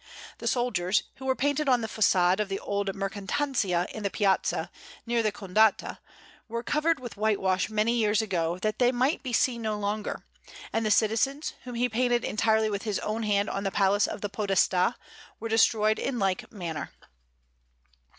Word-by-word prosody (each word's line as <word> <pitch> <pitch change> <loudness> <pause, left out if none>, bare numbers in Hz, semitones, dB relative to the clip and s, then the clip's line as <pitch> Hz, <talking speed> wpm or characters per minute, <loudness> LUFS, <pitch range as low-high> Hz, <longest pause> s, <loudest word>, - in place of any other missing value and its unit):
The - - -4
soldiers, 205 -6 +1
who 265 - -9
were 260 - +2
painted 285 +1 0
on 250 -2 +4
the 225 - -3
façade 190 -4 +3
of 210 -2 -1
the 195 - -2
old 200 -1 -2
Mercatanzia 195 -1 -1
in 215 - -6
the 200 - -1
Piazza, 195 -1 0 0.3
near 235 0 +1
the 215 -1 +1
Condotta, 205 +2 +1 0.5
were 235 +1 -4
covered 305 +4 +1
with 245 -4 -8
whitewash 195 -3 +1
many 215 +2 +1
years 215 -3 +2
ago, 175 -6 -1
that 215 0 -1
they 245 -1 +4
might 255 +5 +1
be 255 - -5
seen 235 0 +1
no 215 -1 -2
longer; 210 +1 -3 0.5
and 225 - +1
the 215 - 0
citizens, 230 +8 +1
whom 245 -1 -6
he 245 +1 +1
painted 240 +1 +1
entirely 220 +1 +2
with 200 -2 -2
his 210 -2 -2
own 215 +2 -2
hand 205 -1 +1
on 195 - -3
the 195 - 0
Palace 200 +1 +2
of - - -6
the 205 - -3
Podestà, 195 0 +2 0.4
were 230 - -5
destroyed 220 -1 +3
in 260 - -2
like 195 -4 -1
manner. 170 -7 -5
215 Hz, 180 wpm, -27 LUFS, 200-235 Hz, 0.5 s, on